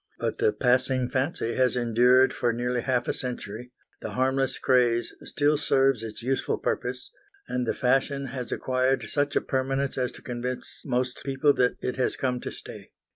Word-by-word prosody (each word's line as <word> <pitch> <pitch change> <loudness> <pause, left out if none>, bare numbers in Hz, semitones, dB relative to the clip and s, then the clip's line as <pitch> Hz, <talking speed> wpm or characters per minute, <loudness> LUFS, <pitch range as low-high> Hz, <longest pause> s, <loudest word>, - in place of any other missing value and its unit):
But - - -3
the - - +3
passing 125 +1 +2
fancy 130 -3 -1
has 130 0 +2
endured 125 +2 +4
for 120 - 0
nearly 120 +1 -1
half 125 -1 0
a - - +1
century, 125 -1 -6 0.3
the - - -5
harmless 130 0 +1
craze 120 -2 +2
still 145 0 +1
serves 135 -4 +2
its 115 0 -7
useful 135 +2 0
purpose, 125 0 -3 0.4
and 125 -1 -2
the - - +1
fashion 135 +2 +1
has 125 -3 -5
acquired 130 -2 0
such 145 0 0
a - - +3
permanence 135 0 -1
as 125 -1 0
to - - -13
convince 125 +1 -5
most 125 -1 -1
people 140 +1 +2
that 125 -2 +2
it 125 - -2
has 130 - 0
come 125 -2 -1
to - - -6
stay. - - -10
130 Hz, 175 wpm, -26 LUFS, 125-135 Hz, 0.4 s, endured